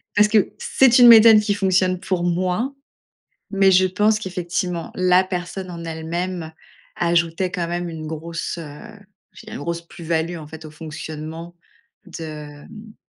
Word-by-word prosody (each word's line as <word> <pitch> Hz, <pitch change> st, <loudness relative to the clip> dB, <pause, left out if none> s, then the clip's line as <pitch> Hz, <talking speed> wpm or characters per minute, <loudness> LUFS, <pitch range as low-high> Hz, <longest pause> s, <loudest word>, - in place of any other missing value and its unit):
parce 210 Hz, 0 st, +5 dB
que 210 Hz, -2 st, +2 dB
c'est 255 Hz, -2 st, +4 dB
une 245 Hz, -, +9 dB
méthode 225 Hz, -1 st, +9 dB
qui 205 Hz, -1 st, 0 dB
fonctionne 185 Hz, -2 st, +1 dB
pour 180 Hz, -2 st, -2 dB
moi, 185 Hz, +9 st, -1 dB, 0.8 s
mais 195 Hz, -1 st, +4 dB
je 185 Hz, 0 st, +5 dB
pense 210 Hz, +3 st, +1 dB
qu'effectivement, 180 Hz, -2 st, -4 dB
la 185 Hz, 0 st, +4 dB
personne 185 Hz, 0 st, -5 dB
en 170 Hz, -1 st, -8 dB
elle-même 165 Hz, +1 st, -4 dB, 0.4 s
ajoutait 170 Hz, +1 st, 0 dB
quand 175 Hz, -4 st, -3 dB
même 175 Hz, 0 st, -3 dB
une 160 Hz, -1 st, -7 dB
grosse, 165 Hz, +2 st, -5 dB
heu, 150 Hz, -3 st, -9 dB, 0.5 s
je -, -, -13 dB
dirais 220 Hz, +1 st, -9 dB
une -, -, -8 dB
grosse 170 Hz, 0 st, -3 dB
plus-value 165 Hz, +1 st, -3 dB
en 155 Hz, -2 st, -10 dB
fait 160 Hz, +1 st, -11 dB
au 155 Hz, -, -10 dB
fonctionnement 160 Hz, +2 st, -8 dB, 0.5 s
de, 150 Hz, -4 st, -9 dB
mmh, 215 Hz, 0 st, -13 dB
175 Hz, 155 wpm, -21 LUFS, 165-190 Hz, 0.8 s, une